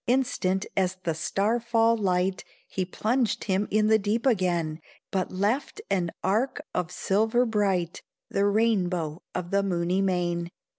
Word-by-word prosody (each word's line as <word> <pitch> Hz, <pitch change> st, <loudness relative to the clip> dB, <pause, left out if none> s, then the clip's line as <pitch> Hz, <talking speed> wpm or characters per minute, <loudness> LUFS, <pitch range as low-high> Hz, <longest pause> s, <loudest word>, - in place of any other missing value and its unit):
Instant 210 Hz, -7 st, +1 dB
as 185 Hz, -1 st, +1 dB
the 165 Hz, -, 0 dB
star 200 Hz, +8 st, 0 dB
fall 230 Hz, -1 st, +3 dB
light, 185 Hz, -2 st, 0 dB, 0.2 s
He 185 Hz, -, -2 dB
plunged 225 Hz, +6 st, 0 dB
him 195 Hz, +1 st, 0 dB
in 215 Hz, 0 st, +2 dB
the 220 Hz, 0 st, +5 dB
deep 215 Hz, +4 st, -1 dB
again, 175 Hz, -9 st, +1 dB, 0.3 s
But 190 Hz, -1 st, -1 dB
left 215 Hz, -, -1 dB
an 180 Hz, -3 st, +1 dB
arch 220 Hz, +8 st, +1 dB, 0.2 s
of 180 Hz, -2 st, -1 dB
silver 220 Hz, +7 st, +2 dB
bright 195 Hz, -6 st, 0 dB, 0.3 s
The 200 Hz, +1 st, +1 dB
rainbow 185 Hz, -7 st, +1 dB
of 180 Hz, -1 st, -3 dB
the 200 Hz, 0 st, +3 dB
moony 180 Hz, -1 st, 0 dB
main. 175 Hz, -2 st, 0 dB
195 Hz, 145 wpm, -27 LUFS, 180-220 Hz, 0.3 s, the